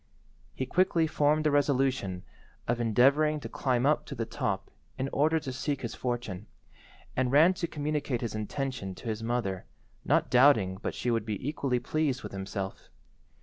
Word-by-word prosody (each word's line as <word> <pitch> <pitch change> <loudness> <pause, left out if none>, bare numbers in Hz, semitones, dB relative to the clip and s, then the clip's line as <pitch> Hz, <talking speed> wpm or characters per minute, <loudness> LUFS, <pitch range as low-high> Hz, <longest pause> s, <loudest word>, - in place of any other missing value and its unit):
He 130 - -2
quickly 170 +2 +2
formed 155 0 +2
the 155 - +2
resolution 130 -10 +1 0.4
of 120 0 0
endeavouring 140 +7 +3
to 115 - -5
climb 125 +1 0
up 150 +1 +3
to 140 - -6
the 115 -2 -2
top - - -3 0.3
in 130 - -1
order 155 +3 +3
to 135 -4 -6
seek 140 +1 -2
his 115 - -3
fortune, 120 -5 -4 0.7
and 130 -1 +1
ran 160 +6 +6
to 170 -2 -3
communicate 145 -4 -2
his 115 - -3
intention 110 -2 -4
to 115 - -7
his 110 0 -3
mother, 115 -5 -2 0.4
not - - +2
doubting 120 -8 +5
but - - -3
she 125 - -1
would 115 -2 +1
be 110 +3 -4
equally 140 -4 0
pleased 150 -2 -1
with 105 - -6
himself. 95 0 -5
130 Hz, 170 wpm, -29 LUFS, 115-145 Hz, 0.7 s, ran